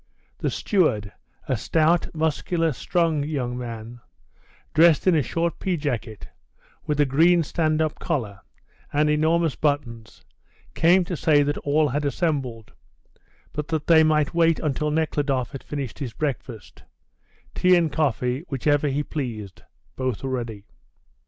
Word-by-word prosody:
The - - 0
steward, 120 - 0 0.4
a 130 - +1
stout, 160 +9 +2
muscular, 160 +1 0
strong 165 +1 0
young 135 -5 -3
man, 120 -1 -7 0.7
dressed 160 0 +5
in 185 - +5
a 155 - +3
short 165 +4 -2
pea 185 -2 -1
jacket, 120 - -4 0.6
with 150 -1 -1
a 145 - +5
green 165 +6 +4
stand 155 0 0
up 155 -1 -3
collar, 115 - -3 0.5
and 150 +1 +2
enormous 160 +1 +2
buttons, 120 -7 -3 0.5
came 180 +3 +4
to 175 0 -4
say 150 -2 +3
that 145 +1 -2
all 150 +1 +1
had 145 +3 -1
assembled, 140 - -2 0.8
but 150 0 -4
that 160 -2 -2
they 160 -2 +6
might 155 -1 +2
wait 165 -1 +3
until 150 0 -1
Nekhludoff 145 -5 -1
had 135 - -7
finished 140 -5 -5
his 125 -5 -5
breakfast 130 - -5 0.7
tea 180 0 +4
and 165 -3 +2
coffee, 130 -4 0
whichever 145 +2 +1
he 145 +1 -1
pleased; 115 - -6 0.3
both 130 -3 -3
were 135 - -3
ready. 115 -5 -4
150 Hz, 140 wpm, -24 LUFS, 130-160 Hz, 0.8 s, they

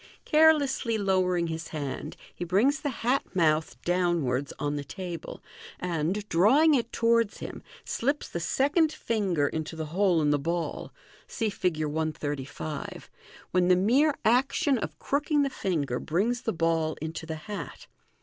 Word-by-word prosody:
Carelessly 295 -7 +4
lowering 185 -3 +1
his 165 -1 -4
hand, 145 -4 -5 0.2
he - - -5
brings 220 - +2
the 290 - -1
hat 250 +1 0
mouth 160 -3 +1
downwards 170 -7 0
on 145 +1 -2
the 145 - -3
tableland, 175 +2 -5
drawing 260 - +5
it 240 -4 0
towards 230 -2 +2
him, - - -7 0.2
slips 280 +5 -1
the 170 - -4
second 290 - +2
finger 195 - 0
into 160 +2 -4
the 160 -1 -4
hole 185 -3 +3
in 145 - +3
the 145 - +2
ball 170 +3 -3 0.4
(see 225 -4 -2
Fig. 160 -5 -1
135), 150 -1 -4 0.4
when 180 0 +3
the 180 - +6
mere 260 +11 +3
action 255 +3 +3
of 155 -3 -5
crooking 290 - +1
the 275 -1 -2
ringer 145 -10 0
brings 225 +9 0
the 225 - -1
ball 165 -2 0
into 160 +1 -5
the 160 - -3
hat. 200 -9 -7
180 Hz, 145 wpm, -28 LUFS, 160-235 Hz, 0.4 s, the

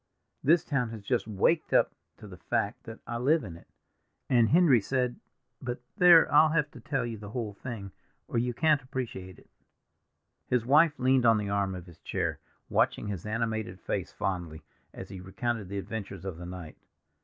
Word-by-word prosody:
This 165 +3 +4
town 125 -5 0
has 110 -2 -8
just 120 +1 0
waked 110 - +1
up - - +4 0.2
to 105 - -11
the 90 -3 -12
fact - - -2
that 115 0 -8
I 120 0 -4
live 150 +6 +3
in 85 -5 -8
it. 85 - -16 0.6
And 120 -3 +5
Henry 155 -8 +5
said—but 125 +1 -4 0.2
there, 175 -4 +7
I'll 155 +1 +7
have 150 -2 +1
to - - -12
tell 135 -5 -2
you 115 -3 -5
the 105 -1 -9
whole 110 -2 -4
thing, 100 -3 -7 0.4
or 115 - 0
you 120 +1 0
can't 155 +3 +2
appreciate 120 -8 -6
it." - - -20 1.0
His 125 -2 +1
wife 150 +4 +5
leaned 130 -1 +3
on 115 -1 +6
the 105 -1 -2
arm 100 -2 0
of 90 -1 -8
his 85 -3 -15
chair, - - -2 0.3
watching - - +1
his 100 -1 -5
animated 110 -4 -2
face - - -3
fondly, 85 -5 -4 0.3
as - - -9
he 95 - -8
recounted 105 +2 -3
the 100 - -4
adventures 100 -2 -6
of 95 -4 -5
the 85 0 -8
night. 90 -3 -8
115 Hz, 185 wpm, -29 LUFS, 100-130 Hz, 1.0 s, there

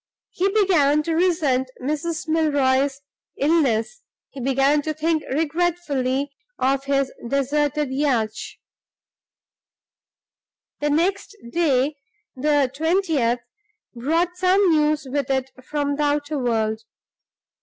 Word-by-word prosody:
He 380 +2 0
began 315 -8 +3
to 330 - -2
resent 320 -7 +1
Mrs. 305 +5 -3
Milroy's 280 -3 +1 0.4
illness; 290 - +1 0.3
he 275 - -9
began 275 +3 +2
to 310 +1 -3
think 315 +1 0
regretfully 290 -3 -1 0.3
of 270 +1 0
his 275 -1 0
deserted 290 +2 0
yacht. 260 -6 +1 2.5
The 295 - 0
next 370 +7 0
day 290 -3 +1 0.4
the 285 -1 +1
twentieth 310 -7 +1 0.5
brought 325 +9 0
some 370 0 +3
news 300 -1 +1
with 275 0 -2
it 265 -1 -1
from 285 0 -2
the 300 - 0
outer 290 0 0
world. 220 -3 0
290 Hz, 100 wpm, -22 LUFS, 265-320 Hz, 2.5 s, began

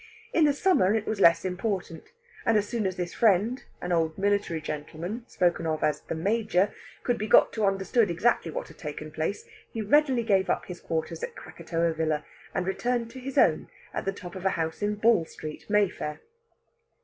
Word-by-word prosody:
In 325 - +5
the 290 - +4
summer 275 - +3
it 220 -1 -1
was 215 - -2
less 170 0 +6
important; 185 - -3 0.3
and 225 - +3
as 205 0 0
soon 220 -4 -1
as 185 - -3
this 180 -1 -4
friend, 225 +4 +2 0.2
an 180 - -3
old 165 -2 +1
military 200 -4 +1
gentleman 160 +9 -5
spoken 170 -2 +1
of 155 -1 -1
as 150 -1 +1
"the - - -5
Major," 200 +2 +1 0.3
could 245 -2 0
be 215 - -2
got - - +6
to 215 -3 +1
understand 195 +3 +2
exactly 170 0 +1
what - - -4
had 160 - -16
taken 150 +1 -6
place, 160 +6 -3 0.3
he 225 - -3
readily 265 +1 +3
gave 195 -5 +2
up - - 0
his 180 -1 -8
quarters 160 0 -3
at - - -4
Krakatoa 170 0 -2
Villa, 155 -2 -1 0.3
and 180 - 0
returned 235 +4 -1
to 260 - -9
his 265 +1 -6
own, - - +4 0.2
at - - -3
the 195 - +1
top 180 -3 -9
of 185 - -7
a 190 - +3
house 160 +2 -2
in 205 0 0
Ball 215 -4 +4
Street, 155 +2 -9
Mayfair. 200 -7 +1
190 Hz, 195 wpm, -27 LUFS, 165-220 Hz, 0.3 s, less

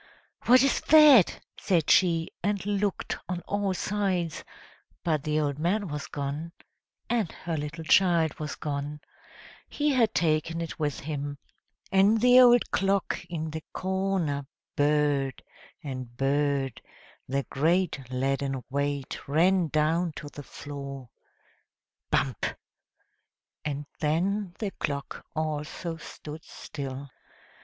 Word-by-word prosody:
"What 255 +2 +7
is 275 - +2
that?" 295 - +7 0.2
said 170 -6 +2
she, 165 -3 +4
and 200 0 -1
looked 205 -1 -1
on 180 -1 -2
all 200 -1 -1
sides; 185 -5 -1 0.6
but 155 -4 +1
the 155 0 0
old 145 -1 -1
man 185 +4 0
was 150 -1 -4
gone, 145 +4 -4 0.5
and 225 -7 0
her 165 -1 -5
little 150 +2 -4
child 170 -2 +3
was 150 -1 -4
gone 145 0 -4 0.7
he 295 0 0
had 240 -5 +2
taken 165 0 +1
it 165 0 -5
with 145 -3 -1
him; 145 -1 -4 0.5
and 200 +3 +5
the 250 +2 +7
old 245 -1 +6
clock 195 -1 0
in 160 -2 -3
the 160 0 -5
corner 185 -7 -1 0.3
burred, 145 -2 +1 0.4
and 130 -4 -6
burred, 140 -1 0 0.5
the 140 +1 0
great 170 +3 +2
leaden 135 0 -1
weight 140 -1 -2
ran 175 +4 +3
down 155 +3 +1
to 145 - -8
the 145 - -9
floor, 140 -3 -8 1.0
bump! 125 -8 +1 1.2
and 145 -1 -3
then 180 +5 0
the 210 -3 -3
clock 140 -5 -4
also 155 +2 -3
stood 155 -1 -9
still. 140 -1 -7
155 Hz, 120 wpm, -28 LUFS, 145-190 Hz, 1.2 s, What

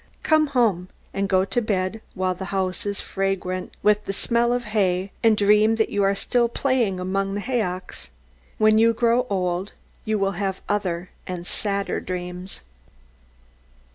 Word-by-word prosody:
Come 310 -1 +4
home, 220 -10 +1 0.2
and 195 0 -1
go 185 0 +3
to 240 +4 0
bed 200 -1 -1
while 185 0 0
the 190 +1 -6
house 190 +1 -2
is 200 -1 -2
fragrant 185 -2 -2
with 210 0 +3
the 195 - -3
smell 235 +4 +1
of 245 0 0
hay, 190 -2 +1
and 225 -2 +4
dream 210 +2 +4
that 220 -1 +1
you 205 - +1
are 195 0 +3
still 240 +3 +1
playing 235 -7 0
among 195 +2 -1
the - - -1
haycocks. 200 - -3 0.5
When 215 0 +5
you 230 +1 +5
grow 235 +2 +2
old, 185 0 -1 0.3
you 215 0 0
will 195 -1 +1
have 190 -1 -1
other 185 -4 -2 0.2
and 180 -1 -5
sadder 200 +1 -2
dreams. 180 +1 -6
200 Hz, 160 wpm, -23 LUFS, 185-220 Hz, 0.5 s, When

